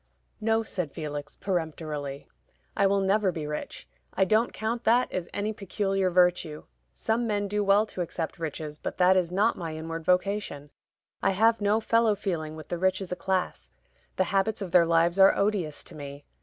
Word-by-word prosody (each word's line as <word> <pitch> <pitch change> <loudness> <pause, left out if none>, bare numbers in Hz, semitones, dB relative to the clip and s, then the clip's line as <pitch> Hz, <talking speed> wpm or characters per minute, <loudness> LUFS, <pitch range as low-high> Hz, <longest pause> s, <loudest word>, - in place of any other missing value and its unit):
"No," 225 +1 +1
said 180 -8 -4
Felix, 145 -2 -6
peremptorily; 155 -6 -3 0.5
"I 200 - +4
will 200 0 +2
never 195 0 +2
be 160 -3 -5
rich. 150 0 -6 0.3
I 190 - +3
don't 220 +4 +2
count 230 +2 -3
that 240 +3 +3
as 175 -2 -3
any 210 +2 -2
peculiar 195 -1 -1
virtue. 180 -3 +2 0.3
Some 225 - -1
men 205 -2 0
do 205 +1 0
well 200 +2 +4
to 190 - -6
accept 170 -1 -4
riches, 155 -1 -5
but - - -5
that 185 +1 +5
is 180 -2 +1
not 205 +4 +2
my 165 -2 -4
inward 165 +1 -5
vocation: 180 -5 0 0.5
I - - +2
have 225 +1 +4
no 205 +2 +3
fellow 230 -1 +3
feeling 165 -6 -3
with 155 - -10
the 175 - -3
rich 190 +1 +2
as 190 -2 -7
a - - 0
class; 185 +1 -2 0.5
the 185 - +2
habits 200 +3 +1
of 195 -4 -5
their 170 -2 +5
lives 170 +2 +3
are 195 - +7
odious 200 -7 0
to - - -12
me. 145 -1 -9
185 Hz, 185 wpm, -27 LUFS, 160-205 Hz, 0.5 s, are